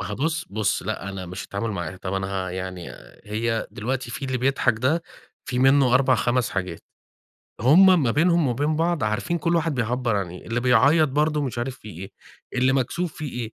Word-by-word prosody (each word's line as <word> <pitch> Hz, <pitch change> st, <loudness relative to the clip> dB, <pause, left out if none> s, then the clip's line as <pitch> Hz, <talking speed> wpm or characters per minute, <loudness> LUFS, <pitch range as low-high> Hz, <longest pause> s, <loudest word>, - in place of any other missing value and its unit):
ما -, -, -4 dB
هو 105 Hz, -, -4 dB
بُص، 160 Hz, +5 st, -1 dB
بُص 105 Hz, -1 st, 0 dB
لأ، 100 Hz, -1 st, -4 dB
أنا 95 Hz, -2 st, -6 dB
مش 90 Hz, 0 st, -6 dB
التعامل 100 Hz, +5 st, -3 dB
معاها. 85 Hz, -3 st, -4 dB
طَب، 90 Hz, +1 st, -5 dB
أنا 95 Hz, 0 st, -1 dB, 0.2 s
ه -, -, -5 dB
يعني 90 Hz, -1 st, -6 dB, 0.3 s
هي 110 Hz, +2 st, -2 dB
دلوقتي 120 Hz, +3 st, -3 dB
في 140 Hz, -, -5 dB
اللي 130 Hz, -1 st, -2 dB
بيضحك 125 Hz, -3 st, +1 dB
ده 150 Hz, +7 st, +1 dB, 0.4 s
في 125 Hz, -4 st, -3 dB
منه 135 Hz, -1 st, +4 dB
4 130 Hz, 0 st, +4 dB
5 120 Hz, -1 st, 0 dB
حاجات 90 Hz, -3 st, -4 dB, 0.8 s
هُم 175 Hz, -, +6 dB
ما 120 Hz, -, +2 dB
بينهم 170 Hz, +1 st, +3 dB
وبين 145 Hz, +6 st, 0 dB
بعض 165 Hz, -5 st, 0 dB
عارفين 105 Hz, +11 st, -1 dB
كل 170 Hz, +2 st, +1 dB
واحد 165 Hz, -2 st, 0 dB
بيعبّر 120 Hz, -1 st, 0 dB
عن 95 Hz, -4 st, -2 dB
إيه، 90 Hz, -, -11 dB
اللي 115 Hz, +1 st, -1 dB
بيعيّط 140 Hz, +6 st, +4 dB
برضه 150 Hz, +2 st, +1 dB
مش 125 Hz, -3 st, -3 dB
عارف 130 Hz, +2 st, -4 dB
في 110 Hz, -, -12 dB
إيه، 95 Hz, +1 st, -8 dB, 0.4 s
اللي 130 Hz, +1 st, +2 dB
مكسوف 145 Hz, +6 st, -1 dB
في 155 Hz, -, -5 dB
إيه 120 Hz, -3 st, -5 dB
125 Hz, 205 wpm, -24 LUFS, 105-145 Hz, 0.8 s, هُم